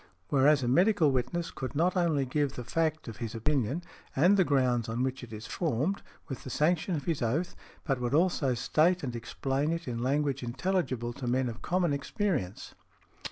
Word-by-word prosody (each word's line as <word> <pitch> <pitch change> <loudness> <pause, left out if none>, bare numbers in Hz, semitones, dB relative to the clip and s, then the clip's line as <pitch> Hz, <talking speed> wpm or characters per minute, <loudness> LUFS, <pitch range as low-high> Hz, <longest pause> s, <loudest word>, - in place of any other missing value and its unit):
Whereas 140 0 +4
a - - 0
medical 175 - +4
witness 135 +7 -1
could 130 +1 -6
not 175 +5 +2
only 165 -6 +2
give 140 +1 0
the 125 - -6
fact 155 +5 -1
of 115 -3 -7
his 115 -2 -5
opinion, 140 +5 0 0.3
and 175 +9 +5
the 190 - +5
grounds 125 -6 +1
on 115 +3 -1
which 130 0 -2
it 120 - -10
is 110 +1 -7
formed, 155 - -1 0.3
with 135 -5 -6
the - - -7
sanction 165 +6 +1
of 145 - -4
his 165 -5 -1
oath, 140 +10 -1 0.3
but 135 -5 0
would 125 +3 0
also 160 -6 +2
state 170 +8 +2
and 125 -3 -3
explain 135 +5 -1
it 170 0 -3
in 120 -1 -3
language 140 +1 0
intelligible 125 -2 -1
to 125 0 -6
men 125 +1 +1
of 115 -1 -6
common 175 -4 +1
experience. 140 - -2
140 Hz, 190 wpm, -30 LUFS, 125-165 Hz, 0.3 s, and